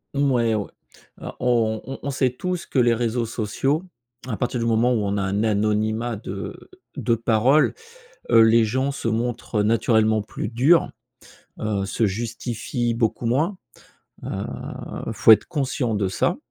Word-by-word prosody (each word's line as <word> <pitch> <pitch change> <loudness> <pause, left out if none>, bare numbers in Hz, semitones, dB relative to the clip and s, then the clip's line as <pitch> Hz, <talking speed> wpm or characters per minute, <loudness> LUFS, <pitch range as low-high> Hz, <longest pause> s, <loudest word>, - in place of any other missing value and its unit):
Mmh, 140 0 +2
ouais, 115 -3 +2
ouais. 105 -2 -2 0.5
Alors, - - -8
on 115 -3 +1
on 135 - -7
on 140 - -2
sait 130 -1 +1
tous 180 +8 -4
que - - -4
les 120 -1 +4
réseaux 115 0 -1
sociaux, 120 - -1 0.4
à 110 -5 -3
partir 125 0 -2
du 115 - -1
moment 115 +2 +3
où 110 -3 0
on 100 0 -1
a 100 - 0
un 100 +2 0
anonymat 110 +2 0
de 100 -1 -7 0.3
de 120 -3 +1
parole, 115 +6 +3 0.6
heu, 115 - +7
les 115 +1 +5
gens 130 +5 0
se 140 - -5
montrent 115 -1 -1
naturellement 110 0 +2
plus 105 - -5
durs, 130 +9 +3 0.7
heu, 105 -2 -1
se 110 +3 0
justifient 115 +3 -3
beaucoup 115 0 -1
moins, 150 - +1 0.7
heu, - - -5 0.8
il - - -2
faut - - +6
être 110 - +6
conscient 135 -6 -1
de 100 -2 0
ça, 95 - 0
115 Hz, 165 wpm, -23 LUFS, 110-125 Hz, 0.8 s, heu